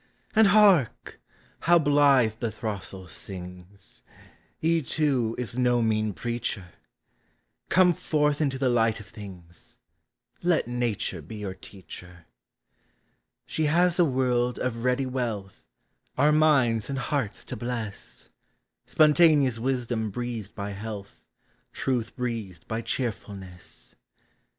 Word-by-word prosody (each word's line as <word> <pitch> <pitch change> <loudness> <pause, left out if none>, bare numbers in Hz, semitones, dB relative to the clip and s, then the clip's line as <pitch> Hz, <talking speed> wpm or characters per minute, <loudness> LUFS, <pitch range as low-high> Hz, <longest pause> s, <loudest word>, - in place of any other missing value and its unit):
And 220 -1 +7
hark! 200 - +4 0.4
how 175 +1 +5
blithe 140 -7 +4
the 115 -2 -2
throstle 100 -4 -5
sings! 90 +2 -9 0.6
He, 165 +1 +2
too, 130 -5 0
is 120 -3 -4
no 120 -1 +3
mean 110 -2 0
preacher; 115 -6 -4 1.0
Come 180 -1 +5
forth 150 -1 0
into 135 -3 0
the 130 0 +1
light 115 -3 +2
of 105 - -10
things 95 -4 -12 0.3
— - - -44
Let 160 - +1
Nature 120 -7 -2
be 85 +9 -10
your 105 -3 -5
teacher. 90 -3 -12 1.2
She 160 - -1
has 175 +3 +3
a - - +7
world 125 -4 +1
of 115 -2 -3
ready 125 +1 +1
wealth, 115 -7 -4 0.5
Our 145 +3 +5
minds 140 -8 +3
and 135 - -2
hearts 135 -5 -2
to - - -6
bless, 115 -3 -6 0.3
— - - -53
Spontaneous 150 -6 +4
wisdom 120 -3 -1
breathed 115 -1 -5
by 100 0 -4
health, 100 0 -7 0.5
Truth 120 -4 -2
breathed 115 -9 -4
by 110 +1 -2
cheerfulness. 100 -6 -5
120 Hz, 120 wpm, -26 LUFS, 105-140 Hz, 1.2 s, And